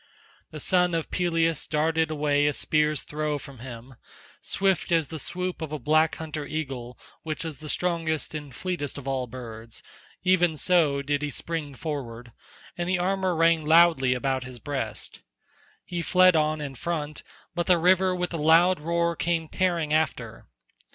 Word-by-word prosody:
The - - -8
son 180 -2 +2
of 165 - -3
Peleus 165 -3 +1
darted 160 +1 +1
away 145 -1 +2
a 145 - +1
spear's 150 0 +1
throw 150 0 -2
from 140 -3 -11
him; 120 +1 -9 0.5
swift 190 -2 0
as 165 -4 +2
the 160 - -6
swoop 180 +4 -4
of 160 -2 -4
a 155 - -2
black 155 +4 +2
hunter 155 -2 -5
eagle 135 -5 -5 0.2
which 155 +1 -4
is 160 -3 -5
the 155 -1 -7
strongest 165 -3 -1
and 145 -2 -6
fleetest 145 -1 -4
of 140 -1 -8
all 130 -2 -1
birds, 115 -2 -9 0.4
even 175 -3 +3
so 150 -5 +2
did 145 +1 0
he 150 - -2
spring 150 -2 -4
forward, 125 -6 -6 0.4
and 175 0 -3
the 185 - +2
armour 185 0 0
rang 165 0 +3
loudly 155 -5 +5
about 130 0 -1
his 125 0 -8
breast. 135 -5 -5 0.7
He 175 -1 -3
fled 185 +1 +5
on 155 0 +1
in 140 -2 -5
front, 150 +2 -4 0.3
but 175 0 -2
the 180 -2 +5
river 185 +2 +3
with 180 -1 -2
a - - -1
loud 165 +4 +5
roar 170 +2 0
came 165 -1 -1
tearing 170 -4 0
after. 125 -8 -1
155 Hz, 165 wpm, -26 LUFS, 140-170 Hz, 0.7 s, loudly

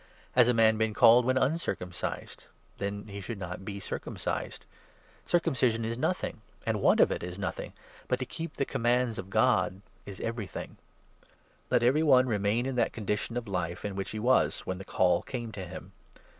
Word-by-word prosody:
Has 125 -2 +5
a - - +4
man 110 -1 +4
been 110 -1 +1
called 120 +2 +7
when 130 +1 +2
uncircumcised? 130 - -2 0.3
Then 100 +1 -3
he 100 -1 -7
should 105 +3 -5
not 90 -1 -6
be 100 0 -5
circumcised. 95 - -4 0.6
Circumcision 130 -10 +1
is 115 +1 -2
nothing; 125 - -2 0.2
the - - +1
want - - +4
of - - +6
it - - -2
is 90 +1 -6
nothing; 100 -1 -4 0.3
but 125 - +1
to 130 - -3
ic - - -30
keep 165 0 -5
the 140 - +1
commands 120 -2 +1
of 95 - -7
God 95 0 +2 0.3
is 100 -2 -8
everything. 115 -4 -5 0.9
Let 120 - +3
every 130 +6 +4
one 130 -5 +6
2C - - -4
remain 105 +3 +1
in 135 - -2
that 115 - +2
condition 105 +2 -2
of 120 -2 -4
life 90 -2 -3
in 100 -2 -3
which 95 0 -3
he 110 - -5
was 125 +4 +2
when 95 0 -4
the 95 - -8
Call 90 -2 +2
came 120 -3 -5
to 95 -4 -6
him. 95 - -9
110 Hz, 190 wpm, -29 LUFS, 100-125 Hz, 0.9 s, called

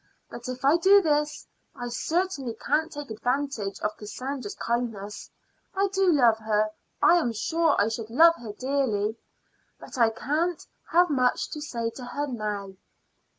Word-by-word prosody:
But 240 +1 -7
if 255 +1 -5
I 290 +4 +6
do 390 +4 +6
this 300 -4 0 0.3
I 245 - -5
certainly 285 -1 -1
can't 315 +3 0
take 290 -5 -7
advantage 245 -2 -2
of 210 0 -1
Cassandra's 235 +2 -5
kindness. 225 -4 -3 0.5
I 395 +1 +2
do 385 -2 +3
love 240 -7 +4
her 215 -1 +1 0.3
I 350 - +7
am 240 -8 0
sure 320 +8 +1
I 205 - +4
should 225 -1 -4
love 330 +8 +7
her 225 -3 -7
dearly 230 -4 -1 0.6
but - - -9
I 230 -1 +6
can't 310 +9 -1 0.3
have 350 -1 +4
much 255 -3 +1
to 300 - -5
say 235 -6 -3
to 255 - -10
her 285 +4 -3
now." 210 -6 -4
255 Hz, 155 wpm, -26 LUFS, 220-300 Hz, 0.6 s, I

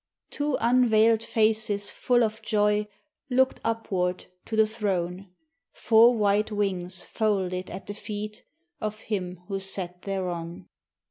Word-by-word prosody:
Two 290 -1 0
unveiled 230 -2 +4
faces 215 -2 +1
full 245 -1 +2
of 220 0 -2
joy 210 -1 +1 0.4
looked 260 +1 +2
upward 190 -6 -1 0.2
to 225 - -4
the 220 0 +5
Throne, 195 -4 -2 0.5
Four 230 +2 +5
white 210 +1 +2
wings 185 -3 -2
folded 190 -4 -1
at 185 - -7
the 205 - -5
feet 210 0 -6 0.4
of 215 0 -4
Him 180 -4 -4
who 195 -1 -2
sat 185 -2 -5
thereon! 175 -3 -4
210 Hz, 125 wpm, -26 LUFS, 185-220 Hz, 0.5 s, the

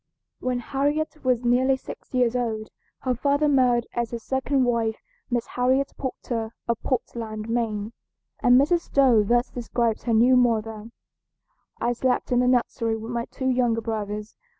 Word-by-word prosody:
When 255 -1 -1
Harriet 290 +5 -1
was 250 -2 +1
nearly 260 +2 +3
six - - -11
years 245 -1 +2
old 220 -3 -2 0.3
her 255 - 0
father 285 +4 +1
married 250 -4 +3
as 235 -1 -1
his 235 -2 -6
second 265 0 0
wife 230 -2 +1 0.3
Miss 240 -2 0
Harriet 260 +2 +1
Porter 230 -4 -4
of 235 -1 -1
Portland, 225 -4 -3
Maine, 225 -2 -2 0.5
and 245 +1 +6
Mrs. 340 +5 +3
Stowe 260 -6 +5
thus 240 +4 +1
describes 235 -2 -1
her 235 - +1
new 245 +3 +5
mother: 225 -3 +1 0.9
"I 240 - +1
slept 255 +1 0
in 245 - +3
the 250 - +3
nursery 235 -2 +1
with 225 +2 -7
my 235 -1 -2
two 260 -1 -3
younger 240 -2 +1
brothers. 210 -1 -4
240 Hz, 155 wpm, -25 LUFS, 225-255 Hz, 0.9 s, and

